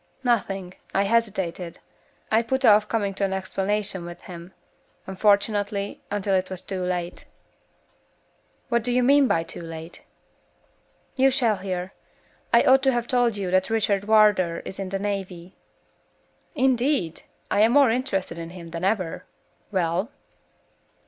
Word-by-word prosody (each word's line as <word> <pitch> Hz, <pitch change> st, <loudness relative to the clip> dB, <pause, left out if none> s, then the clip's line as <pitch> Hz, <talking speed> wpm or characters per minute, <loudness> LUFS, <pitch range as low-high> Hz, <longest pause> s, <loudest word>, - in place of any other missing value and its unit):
"Nothing. 195 Hz, -7 st, -1 dB, 0.2 s
I 195 Hz, -, +3 dB
hesitated; 190 Hz, -6 st, -1 dB, 0.5 s
I 220 Hz, +1 st, +4 dB
put 265 Hz, +3 st, 0 dB
off 210 Hz, -1 st, +6 dB
coming 205 Hz, -3 st, -1 dB
to 195 Hz, -, -3 dB
an 195 Hz, -1 st, 0 dB
explanation 195 Hz, 0 st, -2 dB
with 175 Hz, 0 st, -8 dB
him, 175 Hz, 0 st, -10 dB, 0.5 s
unfortunately, 200 Hz, +1 st, 0 dB
until 200 Hz, -1 st, -1 dB
it 185 Hz, 0 st, +1 dB
was 185 Hz, -1 st, -5 dB
too 190 Hz, -2 st, -4 dB
late." 180 Hz, -1 st, -3 dB, 1.4 s
"What 235 Hz, -1 st, +2 dB
do 245 Hz, +2 st, -2 dB
you 250 Hz, +1 st, +2 dB
mean 280 Hz, +2 st, +5 dB
by 165 Hz, -, +1 dB
too 165 Hz, -, -9 dB
late?" 165 Hz, 0 st, -9 dB, 1.1 s
"You 270 Hz, 0 st, +4 dB
shall 240 Hz, -5 st, +1 dB
hear. 185 Hz, -1 st, -4 dB, 0.6 s
I -, -, +6 dB
ought 265 Hz, +1 st, +5 dB
to 270 Hz, 0 st, +3 dB
have 240 Hz, -2 st, -1 dB
told 240 Hz, -4 st, +2 dB
you 190 Hz, -3 st, -3 dB
that 185 Hz, +2 st, +2 dB
Richard 205 Hz, -3 st, +1 dB
Wardour 210 Hz, -6 st, +4 dB
is 190 Hz, -, -7 dB
in 195 Hz, -1 st, -4 dB
the 195 Hz, -, -2 dB
navy 190 Hz, -3 st, -5 dB, 0.5 s
" -, -, -40 dB
"Indeed! 250 Hz, -, +1 dB, 0.3 s
I 205 Hz, -, +2 dB
am 225 Hz, +2 st, +5 dB
more 280 Hz, -4 st, +6 dB
interested 195 Hz, -8 st, -2 dB
in 165 Hz, 0 st, -6 dB
him 170 Hz, -1 st, -10 dB
than 165 Hz, +1 st, -5 dB
ever. 190 Hz, -4 st, -1 dB, 0.5 s
Well?" 185 Hz, +3 st, 0 dB
195 Hz, 150 wpm, -24 LUFS, 185-225 Hz, 1.4 s, off